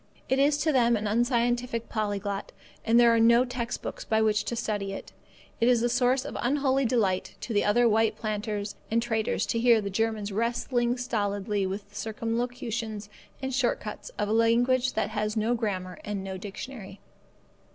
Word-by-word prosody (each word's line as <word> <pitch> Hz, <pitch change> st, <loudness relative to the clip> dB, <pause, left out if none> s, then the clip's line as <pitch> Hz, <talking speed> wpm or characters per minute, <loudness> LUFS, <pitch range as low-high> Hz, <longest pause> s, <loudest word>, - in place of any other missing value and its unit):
It 265 Hz, -, +2 dB
is 285 Hz, +1 st, +4 dB
to 310 Hz, +1 st, +1 dB
them 240 Hz, -4 st, +3 dB
an 210 Hz, -, -4 dB
unscientific 240 Hz, +1 st, 0 dB
polyglot, 205 Hz, -2 st, -3 dB, 0.3 s
and 230 Hz, +1 st, +4 dB
there 235 Hz, -1 st, +6 dB
are 230 Hz, -, +3 dB
no 235 Hz, +2 st, +5 dB
text 245 Hz, -2 st, -4 dB
books -, -, -5 dB
by 220 Hz, -, +1 dB
which 215 Hz, -1 st, +2 dB
to 235 Hz, -, -2 dB
study 205 Hz, -3 st, -2 dB
it. -, -, -8 dB, 0.5 s
It 230 Hz, -, +3 dB
is 240 Hz, -2 st, +3 dB
a 240 Hz, -, +2 dB
source 250 Hz, +2 st, +2 dB
of -, -, -6 dB
unholy 270 Hz, +1 st, +1 dB
delight 210 Hz, -6 st, 0 dB
to 235 Hz, -, -4 dB
the 205 Hz, -, +3 dB
other 235 Hz, +4 st, +4 dB
white 220 Hz, 0 st, +2 dB
planters 210 Hz, -1 st, -3 dB, 0.2 s
and 230 Hz, -, +2 dB
traders 225 Hz, -2 st, 0 dB
to 230 Hz, -, -1 dB
hear 235 Hz, -1 st, +5 dB
the 200 Hz, -2 st, -4 dB
German 220 Hz, +1 st, 0 dB
wrestling 240 Hz, +3 st, 0 dB
stolidly 205 Hz, -4 st, -1 dB
with 200 Hz, +2 st, -5 dB
the -, -, -20 dB
circumlocutions 225 Hz, -1 st, -3 dB, 0.3 s
and 265 Hz, 0 st, -2 dB
short -, -, +1 dB
cuts -, -, -7 dB
of 205 Hz, -, 0 dB
a 215 Hz, -, 0 dB
language 245 Hz, +3 st, +3 dB
that 215 Hz, -1 st, -1 dB
has 215 Hz, +1 st, -2 dB
no 220 Hz, +3 st, +1 dB
grammar 190 Hz, -6 st, -3 dB
and 205 Hz, -2 st, -4 dB
no 190 Hz, 0 st, -5 dB
dictionary. 200 Hz, +1 st, -8 dB
225 Hz, 185 wpm, -27 LUFS, 210-245 Hz, 0.5 s, there